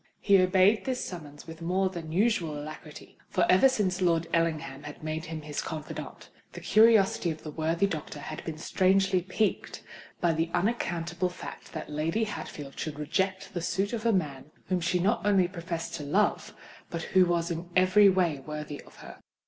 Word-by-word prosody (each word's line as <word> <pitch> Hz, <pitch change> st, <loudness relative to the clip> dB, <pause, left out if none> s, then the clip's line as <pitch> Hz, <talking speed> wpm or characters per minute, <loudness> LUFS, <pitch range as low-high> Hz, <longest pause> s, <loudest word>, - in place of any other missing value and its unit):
He 200 Hz, -2 st, +5 dB
obeyed 185 Hz, +3 st, +4 dB
this 260 Hz, -2 st, -2 dB
summons 150 Hz, -5 st, -9 dB
with 165 Hz, 0 st, -10 dB
more 185 Hz, +3 st, +1 dB
than 165 Hz, -3 st, -7 dB
usual 175 Hz, -5 st, +1 dB
alacrity; 155 Hz, 0 st, -10 dB
for 180 Hz, -3 st, +2 dB
ever 190 Hz, +9 st, +6 dB
since 190 Hz, -7 st, 0 dB
Lord 170 Hz, -2 st, +2 dB
Ellingham 160 Hz, -5 st, 0 dB
had 150 Hz, +1 st, -10 dB
made 155 Hz, +1 st, -3 dB
him 160 Hz, -2 st, -6 dB
his 150 Hz, -1 st, -3 dB
confidant, 155 Hz, -2 st, -7 dB, 0.2 s
the -, -, -7 dB
curiosity 215 Hz, -5 st, +4 dB
of 160 Hz, -1 st, -5 dB
the 155 Hz, -, -6 dB
worthy 165 Hz, +4 st, +1 dB
doctor 155 Hz, -5 st, -4 dB
had 155 Hz, +1 st, -7 dB
been 160 Hz, -2 st, -5 dB
strangely 190 Hz, +2 st, +2 dB
piqued 190 Hz, +4 st, -2 dB, 0.4 s
by 170 Hz, -2 st, +2 dB
the 165 Hz, +1 st, 0 dB
unaccountable 175 Hz, -3 st, -1 dB
fact 180 Hz, -, -9 dB
that 155 Hz, -, -5 dB
Lady 155 Hz, +8 st, -1 dB
Hatfield 145 Hz, -9 st, -6 dB
should 155 Hz, -2 st, -4 dB
reject 190 Hz, +5 st, -2 dB
the 175 Hz, -, -3 dB
suit 195 Hz, +5 st, -1 dB
of 225 Hz, -2 st, -3 dB
a 230 Hz, -, +3 dB
man 150 Hz, -9 st, -1 dB, 0.2 s
whom 185 Hz, -1 st, +1 dB
she 175 Hz, +2 st, +1 dB
not 200 Hz, +6 st, +1 dB
only 195 Hz, -3 st, +4 dB
professed 170 Hz, -2 st, -5 dB
to 155 Hz, -, -4 dB
love, 195 Hz, +9 st, 0 dB, 0.3 s
but 165 Hz, -1 st, -4 dB
who 185 Hz, -1 st, +6 dB
was 170 Hz, -1 st, 0 dB
in 170 Hz, +1 st, -5 dB
every 185 Hz, +2 st, +6 dB
way 175 Hz, -6 st, +1 dB
worthy 150 Hz, +1 st, -6 dB
of -, -, -18 dB
her. -, -, -11 dB
175 Hz, 180 wpm, -28 LUFS, 155-190 Hz, 0.4 s, ever